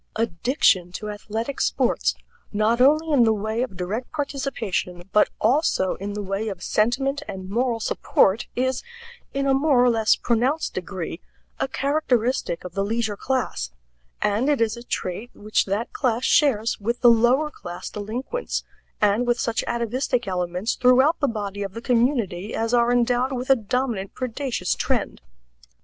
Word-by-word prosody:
Addiction 205 - +2
to 210 +2 -5
athletic 220 +6 -4
sports, - - +1 0.4
not 215 +3 +2
only 310 +4 +4
in 260 -4 +6
the 225 - +4
way 220 +3 -2
of 215 -7 -4
direct 205 +7 -4
participation, 245 - -3
but 210 - +4
also 230 - +2
in 200 +1 -5
the 205 0 -4
way 195 +3 -2
of 190 -3 -7
sentiment 270 +6 +1
and 190 0 -7
moral 235 +1 0
support, 215 -1 +2
is, 260 +1 0 0.5
in 275 0 -1
a 270 - +3
more 270 -2 +4
or 245 - +5
less 225 -2 +3
pronounced 250 +7 0
degree, 185 -2 -5 0.4
a - - 0
characteristic 260 - 0
of 180 - -7
the 195 +1 0
leisure 220 0 -1
class; 250 - -2 0.5
and 210 +7 +1
it 290 - +2
is 225 -1 +1
a 235 - -9
trait 220 -1 -4
which 215 +1 0
that 200 +4 -2
class 245 -2 0
shares 235 -7 +3
with 235 +4 -2
the 240 -2 +8
lower 250 +7 +3
class 175 -9 -8
delinquents, 240 - -4 0.4
and 210 +4 +2
with 240 0 +2
such 230 -1 0
atavistic 240 +1 -1
elements 180 +3 -1
throughout 260 +5 +4
the 285 - +2
body 205 -4 -4
of 195 0 -5
the - - -4
community 230 -6 0
as 225 +1 -1
are 240 0 +4
endowed 245 +2 +2
with 255 +1 -1
a - - +8
dominant 230 -3 -2
predaceous 250 -7 -2
trend. - - -2
230 Hz, 160 wpm, -24 LUFS, 205-255 Hz, 0.5 s, the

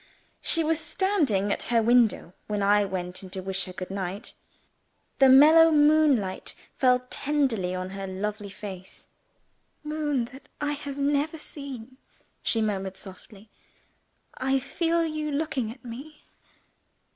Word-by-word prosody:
She 330 - +2
was 320 0 +1
standing 300 - +1
at - - -3
her 235 -1 +4
window 230 -6 +3
when 210 -1 -1
I 205 +1 +4
went 180 -2 -4
in 190 - -10
to 190 +1 -5
wish 190 0 -2
her 185 - -8
good 185 +1 -7
night. 195 +1 -5 0.9
The 270 -1 +7
mellow 310 +5 +8
moonlight 295 -10 +3 0.2
fell 250 -1 +3
tenderly 260 -11 0
on 185 +1 -4
her 195 0 -5
lovely 205 +2 -4
face. 190 -2 -8 0.7
"Moon 300 -4 -1
that 270 - -14
I 295 0 -1
have 285 -1 -5
never 290 +3 0
seen," 265 -5 -8 0.4
she 225 -1 +1
murmured 195 -3 -2
softly, 200 +2 -12 0.8
"I 265 +1 0
feel 335 +5 0
you 310 -1 -3
looking 285 -5 -1
at 255 +2 -14
me! 275 +6 -9
245 Hz, 135 wpm, -26 LUFS, 195-295 Hz, 0.9 s, mellow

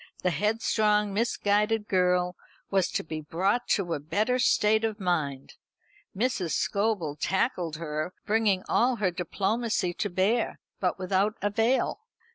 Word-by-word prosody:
The 180 - +2
headstrong 210 +2 +1
misguided 210 0 +1
girl 180 -1 +2 0.4
was 190 -2 +3
to - - -1
be 155 -1 -5
brought 190 +10 0
to 175 -4 -2
a - - -2
better 215 - 0
state 220 -2 +3
of 220 -1 -1
mind. 155 -8 -2 0.6
Mrs. 205 -7 0
Scobel 200 -8 0
tackled 175 - -1
her, 155 +1 -3
bringing 210 -3 +2
all 250 +1 +2
her 205 -5 0
diplomacy 195 +2 -1
to 205 - -2
bear, 200 +6 0 0.2
but 180 -2 0
without 190 +3 0
avail. 225 - +1
200 Hz, 130 wpm, -27 LUFS, 180-220 Hz, 0.6 s, was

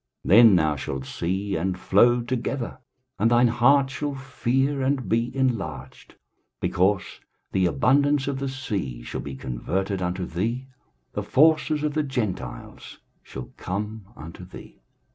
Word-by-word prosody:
23:060:005 - - -4
Then 115 -3 +8
thou 80 -3 +2
shalt 65 -1 -5
see, 95 +7 -2
and 90 +2 -2
flow 120 +7 +4
together, 125 +1 -3 0.4
and 115 - +3
thine 120 0 +4
heart 135 +3 +4
shall 145 +1 -3
fear, 135 +1 -1
and 130 -1 0
be 115 +2 +1
enlarged; 90 - -3 0.4
because 95 +2 +1 0.5
the 95 -1 +2
abundance 135 - +2
of 140 -1 -2
the 135 0 -2
sea 100 - -4
shall - - -5
be 70 -2 -7
converted 95 - -3
unto 90 +1 -2
thee, 115 +11 -2 0.5
the - - -2
forces 155 0 +3
of 150 -1 0
the 155 - +1
Gentiles 105 - -5 0.2
shall - - -9
come 105 +2 -5
unto 85 +3 -10
thee. 90 - -13
115 Hz, 145 wpm, -25 LUFS, 90-135 Hz, 0.5 s, Then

